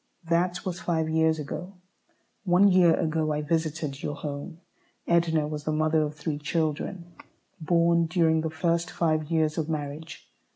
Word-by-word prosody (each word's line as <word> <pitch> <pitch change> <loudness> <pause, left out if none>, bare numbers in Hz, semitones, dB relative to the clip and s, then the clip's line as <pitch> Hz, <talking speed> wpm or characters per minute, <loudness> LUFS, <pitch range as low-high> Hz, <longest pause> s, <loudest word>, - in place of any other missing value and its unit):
That 175 +4 0
was 180 -2 -3
five 160 -3 -1
years 160 0 +2
ago. 175 +5 -6 0.7
One 190 +1 +5
year 180 -3 +5
ago 160 -2 0
I 150 0 -1
visited 155 -2 -2
your 145 - -3
home. 150 +4 -6 0.5
Edna 165 -3 +2
was 150 -1 -5
the 155 - 0
mother 155 +1 +2
of 150 0 -2
three 150 0 -3
children, 165 +3 -2 0.5
born 170 +1 +2
during 160 -2 +2
the 160 - -2
first 170 +2 0
five 155 -2 0
years 160 -1 +1
of 155 0 -2
marriage. 155 +1 -5
160 Hz, 155 wpm, -27 LUFS, 155-170 Hz, 0.7 s, One